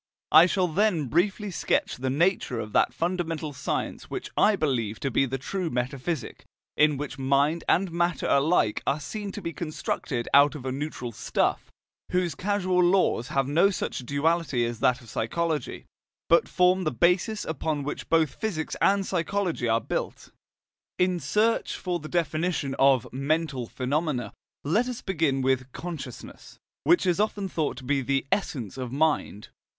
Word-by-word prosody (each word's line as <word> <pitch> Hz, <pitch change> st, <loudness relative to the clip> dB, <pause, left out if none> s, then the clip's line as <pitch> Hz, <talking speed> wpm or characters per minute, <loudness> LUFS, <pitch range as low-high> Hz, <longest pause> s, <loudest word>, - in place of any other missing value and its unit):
I 160 Hz, +3 st, +8 dB
shall 185 Hz, -1 st, +1 dB
then 175 Hz, -2 st, +1 dB
briefly 200 Hz, -, 0 dB
sketch -, -, 0 dB
the 130 Hz, +1 st, -2 dB
nature 150 Hz, -4 st, +1 dB
of 105 Hz, -2 st, -6 dB
that -, -, +3 dB
fundamental 165 Hz, 0 st, -2 dB
science 130 Hz, -, -3 dB
which -, -, -5 dB
I 210 Hz, 0 st, +4 dB
believe 120 Hz, -, -1 dB
to 135 Hz, -, -1 dB
be 135 Hz, -, +2 dB
the 135 Hz, +2 st, -3 dB
true 180 Hz, +6 st, -3 dB
metaphysic, 130 Hz, +3 st, -3 dB, 0.3 s
in 150 Hz, -1 st, +4 dB
which 140 Hz, -1 st, -6 dB
mind 140 Hz, +5 st, +2 dB
and 185 Hz, 0 st, +2 dB
matter 170 Hz, -2 st, 0 dB
alike 140 Hz, -6 st, +2 dB
are 145 Hz, -, +1 dB
seen 205 Hz, +6 st, -5 dB
to -, -, -7 dB
be 170 Hz, -, -4 dB
constructed 145 Hz, -6 st, -3 dB
out 140 Hz, +2 st, +6 dB
of 135 Hz, -3 st, -8 dB
a 130 Hz, -, -1 dB
neutral 135 Hz, -3 st, -4 dB
stuff, -, -, -1 dB, 0.4 s
whose 180 Hz, -3 st, 0 dB
causal 185 Hz, 0 st, +1 dB
laws 175 Hz, -9 st, +2 dB
have 135 Hz, -2 st, 0 dB
no 165 Hz, +7 st, +4 dB
such 195 Hz, -, -3 dB
duality 140 Hz, 0 st, 0 dB
as 115 Hz, -1 st, -4 dB
that 125 Hz, +2 st, +2 dB
of 115 Hz, -, -14 dB
psychology, 160 Hz, +7 st, -2 dB, 0.4 s
but 170 Hz, -, +4 dB
form 180 Hz, +1 st, +3 dB
the 155 Hz, -, +1 dB
basis 180 Hz, -, +1 dB
upon 155 Hz, -1 st, -2 dB
which 145 Hz, -, -5 dB
both 160 Hz, -4 st, +3 dB
physics 190 Hz, -8 st, -3 dB
and 195 Hz, 0 st, +3 dB
psychology 180 Hz, -, -1 dB
are 115 Hz, 0 st, +3 dB
built. 110 Hz, -, -4 dB, 0.7 s
In 180 Hz, -1 st, +2 dB
search 220 Hz, +6 st, +1 dB
for 175 Hz, -1 st, -2 dB
the 155 Hz, 0 st, -9 dB
definition 165 Hz, -4 st, -1 dB
of 135 Hz, -3 st, +4 dB
"mental 140 Hz, -2 st, -1 dB
phenomena," 130 Hz, -3 st, -2 dB, 0.3 s
let 210 Hz, -, +1 dB
us 250 Hz, -2 st, -5 dB
begin 155 Hz, -8 st, 0 dB
with 130 Hz, 0 st, 0 dB
"consciousness," 175 Hz, -2 st, -8 dB, 0.3 s
which 350 Hz, -, +4 dB
is 180 Hz, 0 st, +1 dB
often 205 Hz, -2 st, 0 dB
thought 155 Hz, -7 st, -2 dB
to 130 Hz, -, -9 dB
be 140 Hz, +2 st, +1 dB
the 135 Hz, +1 st, 0 dB
essence 130 Hz, -, -2 dB
of 125 Hz, -2 st, -4 dB
mind. 145 Hz, -7 st, 0 dB
155 Hz, 165 wpm, -26 LUFS, 135-180 Hz, 0.7 s, I